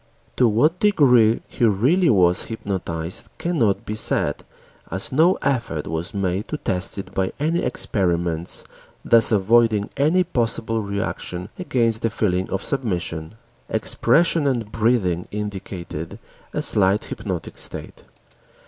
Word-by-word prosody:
To 125 - +4
what 150 +11 +2
degree 125 - +4
he - - -4
really 130 - +3
was 90 -6 +3
hypnotized 90 -6 -4
cannot 130 - 0
be 105 - -3
said 110 - 0 0.5
as 95 +2 -3
no 160 +7 +4
effort 115 - -1
was 80 +4 -4
made 100 +1 -2
to 150 - -3
test 95 -7 -2
it 95 -1 -7
by 95 -1 0
any 160 +4 +1
experiments, 85 -5 -1 0.4
thus 115 0 +5
avoiding 110 0 +3
any 155 +6 +3
possible 115 -7 -1
reaction 100 -2 -4
against 115 -10 0
the 115 - +1
feeling 95 -4 -1
of 95 - -2
submission. 90 - -3 0.3
Expression 145 +8 +2
and 115 -6 -1
breathing 105 -7 +1
indicated 95 -6 -6 0.3
a - - -1
slight 100 +1 +2
hypnoid 95 -6 -5
state. - - -6
105 Hz, 125 wpm, -22 LUFS, 95-125 Hz, 0.5 s, thus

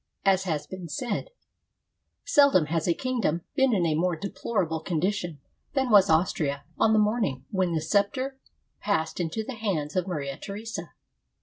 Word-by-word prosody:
As 190 -1 +3
has 155 -4 -1
been 185 0 -7
said: 235 - -3 0.3
— - - -54
" - - -53
Seldom 280 - +5
has 160 +1 -1
a 170 - +4
kingdom 235 - -1
been 265 -1 +3
in 190 -6 +2
a 160 - +2
more 175 +3 +1
deplorable 170 -2 -2
condi 180 +4 +1
tion 175 -7 -5 0.4
than 265 -3 +1
was 200 -2 +7
Austria 160 -4 +1 0.2
on 220 - +4
the - - +4
morning 210 - +1
when 185 -3 +1
the 160 - 0
scepter 255 - 0 0.4
passed 160 -6 -1
into 175 +6 -2
the 260 - -6
hands 190 -10 -2
of 185 -1 0
Maria 140 -6 -3
Theresa. 215 +3 -6
185 Hz, 175 wpm, -27 LUFS, 160-220 Hz, 0.4 s, was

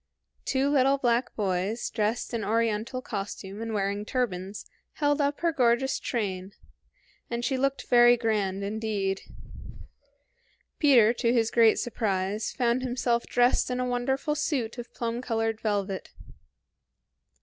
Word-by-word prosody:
Two 270 +1 +1
little 275 -1 +4
black 240 -1 0
boys, 195 +2 -1
dressed 220 +2 -1
in 230 -2 -2
oriental 230 +4 -1
costume 200 -2 -6
and 225 0 -4
wearing 200 -1 -1
turbans, 205 -5 -3 0.3
held 290 0 +1
up 285 0 -1
her 340 -1 +2
gorgeous 255 -1 +2
train, 195 -4 -3 0.8
and 235 0 -2
she 265 - 0
looked 275 +1 -1
very 240 0 +6
grand 205 -4 -1
indeed. 200 -2 -2 1.6
Peter, 240 -7 +6
to 235 -1 +1
his 230 -2 +2
great 230 -2 +5
surprise, 210 -3 -1
found 245 0 +1
himself 245 -2 -1
dressed 245 +1 +2
in 250 0 -2
a 250 - 0
wonderful 265 +4 -1
suit 275 -6 -2
of 240 - -8
plum 235 0 -3
colored 225 -2 -1
velvet. 200 -3 -2
235 Hz, 130 wpm, -27 LUFS, 210-250 Hz, 1.6 s, very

